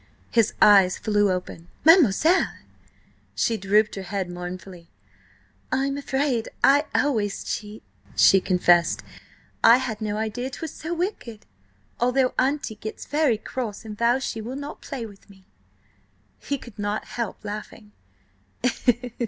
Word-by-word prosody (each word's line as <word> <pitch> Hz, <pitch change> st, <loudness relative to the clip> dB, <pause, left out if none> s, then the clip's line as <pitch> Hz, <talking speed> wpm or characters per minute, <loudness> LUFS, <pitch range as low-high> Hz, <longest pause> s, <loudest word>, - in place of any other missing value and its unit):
His 230 Hz, -2 st, +2 dB
eyes 195 Hz, -3 st, +6 dB
flew 205 Hz, -2 st, +1 dB
open. 180 Hz, -2 st, -5 dB, 0.2 s
"Mademoiselle!—" 325 Hz, -, +5 dB, 0.9 s
She 230 Hz, -, +1 dB
drooped 210 Hz, +1 st, +2 dB
her 195 Hz, -, -5 dB
head 190 Hz, -1 st, -4 dB
mournfully. 180 Hz, 0 st, -8 dB, 0.8 s
"I'm 275 Hz, +1 st, 0 dB
afraid 270 Hz, -4 st, -1 dB
I 285 Hz, +2 st, +5 dB
always 220 Hz, -8 st, 0 dB
cheat," 210 Hz, +1 st, -5 dB, 0.3 s
she 195 Hz, -, +6 dB
confessed. 175 Hz, -2 st, +3 dB, 0.6 s
"I 230 Hz, +2 st, +8 dB
had 240 Hz, -4 st, -4 dB
no 210 Hz, -1 st, -2 dB
idea 220 Hz, +4 st, -3 dB
'twas 315 Hz, +3 st, -6 dB
so 335 Hz, +2 st, -5 dB
wicked, 335 Hz, -, -4 dB, 0.5 s
although 250 Hz, +1 st, +2 dB
Auntie 270 Hz, -2 st, 0 dB
gets 215 Hz, +1 st, -7 dB
very 290 Hz, -6 st, +1 dB
cross 225 Hz, -2 st, -6 dB
and 215 Hz, -1 st, -7 dB
vows 240 Hz, +4 st, +1 dB
she 225 Hz, -, -4 dB
will 240 Hz, +4 st, -6 dB
not 285 Hz, +1 st, -7 dB
play 260 Hz, -5 st, -6 dB
with 205 Hz, -1 st, -15 dB
me." 190 Hz, -1 st, -18 dB, 0.9 s
He 285 Hz, -, -3 dB
could 240 Hz, -5 st, -14 dB
not 205 Hz, +1 st, -2 dB
help 235 Hz, -3 st, -5 dB
laughing. 210 Hz, 0 st, -8 dB
220 Hz, 130 wpm, -24 LUFS, 200-265 Hz, 0.9 s, I